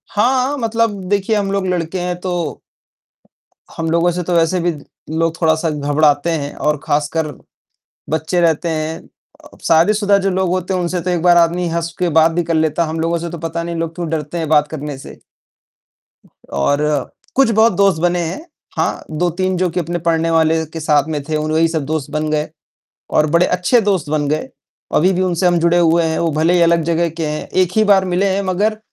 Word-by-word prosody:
हाँ, 255 +6 +1
मतलब 230 -3 0
देखिए 205 +2 +1
हम 200 -2 -1
लोग 195 -1 -1
लड़के 180 0 -2
हैं 180 0 -2
तो 175 -4 -3 1.2
हम 165 0 -2
लोगों 170 +1 +2
से 180 +1 -3
तो 175 - -2
वैसे 170 +2 +2
भी 175 0 +1 0.5
लोग 165 +1 -1
थोड़ा-सा 160 0 +2
घबराते 145 +1 +1
हैं 145 -3 -3
और 150 -1 -1
खासकर 150 +2 0 0.8
बच्चे 160 +3 0
रहते 170 0 +1
हैं 160 0 -3 0.4
अ, - - -16
शादीशुदा 200 +5 +4
जो - - +3
लोग 185 0 0
होते 185 +1 -1
हैं 185 - 0
उनसे 175 0 -2
तो 180 - -3
एक 175 -2 0
बार 175 0 +5
आदमी 170 +1 +2
हँस 170 0 -3
के 180 -1 +1
बात 160 +1 +4
भी 175 +1 -1
कर 165 - -2
लेता 160 +1 +1
है, 160 - -4
हम 160 +1 -4
लोगों 165 +1 0
से 170 +1 -5
तो 170 - -6
पता 165 +1 -4
नहीं 170 0 -4
लोग 165 0 -3
क्यों 170 -2 -4
डरते 155 +1 -3
हैं 165 -2 -2
बात 150 -1 +4
करने 150 -2 -6
से। 135 - -12 1.3
और 105 - 0 0.5
कुछ 270 -3 +4
बहुत 220 0 +4
दोस्त 195 -3 +2
बने 175 0 +1
हैं, 175 - -4 0.3
हाँ, - - -1
2-3 180 +3 -1
जो 180 0 +1
कि 170 - -2
अपने 175 +1 -3
पढ़ने 165 0 0
वाले 160 0 +2
के 165 - -4
साथ 150 -2 +2
में 150 -2 -2
थे, 155 +2 -2
वही 155 +2 +1
सब 160 -3 -2
दोस्त 155 -1 -3
बन 155 0 -2
गए 150 0 -1 0.6
और 155 - +2
बड़े 170 +2 +4
अच्छे 180 +8 +2
दोस्त 190 -8 0
बन 150 -1 0
गए, 155 - -2 0.5
अभी 180 +5 +4
भी 185 - 0
उनसे 180 -1 +1
हम 175 -1 +3
जुड़े 170 +1 +3
हुए 170 0 +3
हैं, 160 0 -1
वो 165 -1 0
भले 160 +3 +2
ही 175 - +3
अलग 170 -1 +3
जगह 170 +1 0
के 165 0 -4
हैं, 150 0 -4
1 185 -1 +1
ही 220 - +4
बार 200 -2 +4
मिले 180 +2 0
हैं 200 - 0
मगर 205 +4 0
170 Hz, 210 wpm, -17 LUFS, 160-180 Hz, 1.3 s, बार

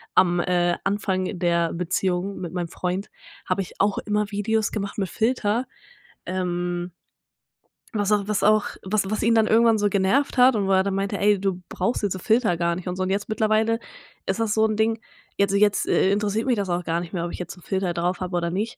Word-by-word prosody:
am, 175 -1 +4
äh, 175 -1 +1
Anfang 195 -2 -1
der 170 -1 +1
Beziehung 180 +2 -1
mit 170 -3 -5
meinem 175 -2 -2
Freund 185 +4 -3 0.4
habe 185 +1 0
ich 185 - -9
auch 200 0 +2
immer 210 -1 -1
Videos 215 +2 0
gemacht 200 -2 -4
mit 195 -3 -1
Filter. 230 0 0 0.6
Ähm 175 -1 -2 1.0
was 205 -1 0
auch 205 -1 +2
was 210 - 0
auch 215 0 +4 0.2
was 195 0 0
was 215 - -1
ihn 230 - +4
dann 220 -1 +4
irgendwann 225 -1 +4
so 205 - +2
genervt 200 +9 +1
hat 250 0 +6
und 200 -2 0
wo - - +1
er 190 0 +4
dann 195 0 -1
meinte: 195 +1 -1
„Ey, 205 -1 +3
du 190 -2 -1
brauchst 235 -1 -1
jetzt 200 -2 +1
so 185 - -6
Filter 220 -1 +2
gar 170 0 0
nicht“ 180 +1 -7
und 180 - -2
so. 185 - -4
Und 185 - -2
jetzt 200 +2 -1
mittlerweile 220 +1 +1 0.5
ist 190 +3 -1
das 225 -2 +1
so 220 0 +3
'n 215 - -1
Ding, 220 +1 +1 0.4
jetzt 200 -1 +2
so 200 - +2
jetzt, 205 0 +2
äh, 190 - +3
interessiert 210 +3 0
mich 255 - +2
das 200 -3 -2
auch 175 0 -1
gar 165 0 -1
nicht 175 +2 -7
mehr, 170 -2 -2
ob 175 - -5
ich - - -7
jetzt 180 +1 -6
'n 180 - -16
Filter 190 -3 -1
drauf 175 +1 -1
habe 180 -1 -2
oder 170 0 -1
nicht. 210 +5 -3
195 Hz, 230 wpm, -24 LUFS, 180-215 Hz, 1.0 s, hat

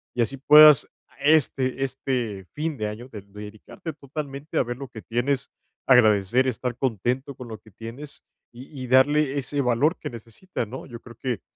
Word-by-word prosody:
Y 120 - +1
así 135 +4 -1
puedas 150 +1 +8 0.2
a - - -26
este 135 -4 +2
este 125 -7 -3
fin 155 0 -3
de 110 - -2
año 115 +5 -8
de 110 - -8
dedicarte 105 - -9
totalmente 140 0 -7
a - - +4
ver 120 0 -5
lo 135 0 -7
que 115 -3 -10
tienes, 130 +5 -1 0.4
agradecer, 120 0 +4
estar 125 -1 -3
contento 130 +3 -2
con 125 -1 -10
lo 110 - -7
que 110 +1 -20
tienes, 115 +8 -10 0.3
y 120 +2 -10 0.2
y - - -6
darle 140 +2 +3
ese 140 +1 -3
valor 130 +7 +2
que - - -5
necesita, 120 - -6
¿no? 125 +5 -8
Yo 120 -3 -10
creo 120 -1 -13
que 125 -5 -3
130 Hz, 180 wpm, -24 LUFS, 115-140 Hz, 0.4 s, puedas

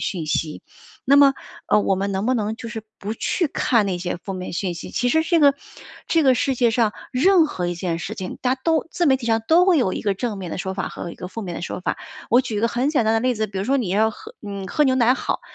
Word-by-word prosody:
讯 175 -5 -3
息， 155 0 -2 0.4
那 280 +2 +5
么， 280 -1 +6 0.3
呃， - - +4
我 195 - +2
们 195 +1 -2
能 195 +2 -2
不 255 - +2
能 220 -2 -1
就 240 - -8
是 225 -2 -6 0.2
不 210 +2 -4
去 340 - -1
看 235 -5 +1
那 185 -3 -2
些 175 0 -3
负 195 +3 -7
面 185 -2 -6
信 180 -1 -2
息， 170 - -8
其 245 0 0
实 320 +3 +3
这 335 +1 +2
个 285 -3 +5 0.5
这 325 -2 +2
个 260 -2 +5
世 265 +2 0
界 240 -1 +2
上 225 -2 +1 0.2
任 345 +7 +5
何 180 -11 -3
一 175 - -2
件 170 -1 -3
事 195 +6 -5
情， 185 -4 -6
大 255 0 +1
家 260 - -21
都 325 -1 +2
自 350 - 0
媒 265 -3 +4
体 235 - -7
上 225 -1 +1
都 350 +3 +5
会 365 - +5
有 215 -10 +1
一 - - -3
个 200 -2 0
正 215 0 -3
面 180 -3 -6
的 - - -4
说 190 +1 -3
法 195 - -3
和 170 - -7
一 - - -9
个 180 - -8
负 225 +3 -6
面 175 -3 -5
的 - - -5
说 175 - -5
法。 - - -2 0.3
我 245 +3 +6
举 230 -5 -4
一 - - 0
个 230 - +2
很 250 +4 0
简 280 -7 +1
单 220 - +2
的 225 - +2
例 255 +1 +1
子， 215 0 -1
比 195 -1 -6
如 190 - -2
说 270 +5 +2
你 240 -8 -1
要 220 +3 +3
喝 435 - -12
你 200 -2 -6
喝 300 - +2
牛 260 - +3
奶 250 -1 +4
好， - - -3
225 Hz, 315 characters per minute, -22 LUFS, 190-265 Hz, 0.5 s, 么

